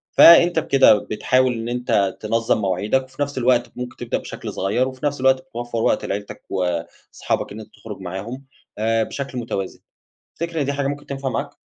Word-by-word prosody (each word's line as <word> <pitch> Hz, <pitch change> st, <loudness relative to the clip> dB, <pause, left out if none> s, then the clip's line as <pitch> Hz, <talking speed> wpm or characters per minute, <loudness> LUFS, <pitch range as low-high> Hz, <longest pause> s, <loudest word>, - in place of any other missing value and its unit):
فأنت 170 Hz, 0 st, +8 dB
بكده 135 Hz, -6 st, +6 dB
بتحاول 125 Hz, +5 st, +1 dB
إن 115 Hz, 0 st, -4 dB
أنت 120 Hz, -6 st, 0 dB
تنظم 115 Hz, +1 st, +1 dB
مواعيدك 100 Hz, +7 st, +1 dB
وفي 130 Hz, +2 st, -11 dB
نفس 145 Hz, -1 st, -2 dB
الوقت 120 Hz, -1 st, +2 dB
ممكن 125 Hz, 0 st, -6 dB
تبدأ 120 Hz, -, -2 dB
بشكل -, -, -7 dB
صغيّر، 105 Hz, +7 st, 0 dB
وفي 130 Hz, +1 st, -6 dB
نفس 145 Hz, -2 st, -1 dB
الوقت 130 Hz, 0 st, +4 dB
بتوفر 120 Hz, -1 st, -6 dB
وقت -, -, +1 dB
لعيلتك 100 Hz, +1 st, -5 dB
وأصحابك 90 Hz, -3 st, -3 dB
إن 105 Hz, -, -7 dB
أنت 110 Hz, -, -11 dB
تخرج 105 Hz, -3 st, -9 dB
معاهم 105 Hz, +9 st, -6 dB, 0.3 s
آآ 110 Hz, +1 st, +1 dB
بشكل 135 Hz, +1 st, -5 dB
متوازن، 100 Hz, -5 st, -4 dB, 0.6 s
تفتكر 170 Hz, -1 st, -3 dB
إن -, -, +1 dB
دي 140 Hz, -, 0 dB
حاجة 140 Hz, -1 st, -1 dB
ممكن 145 Hz, +1 st, -4 dB
تنفع 135 Hz, -1 st, -3 dB
معاك؟ 140 Hz, +2 st, -3 dB
125 Hz, 180 wpm, -21 LUFS, 105-135 Hz, 0.6 s, فأنت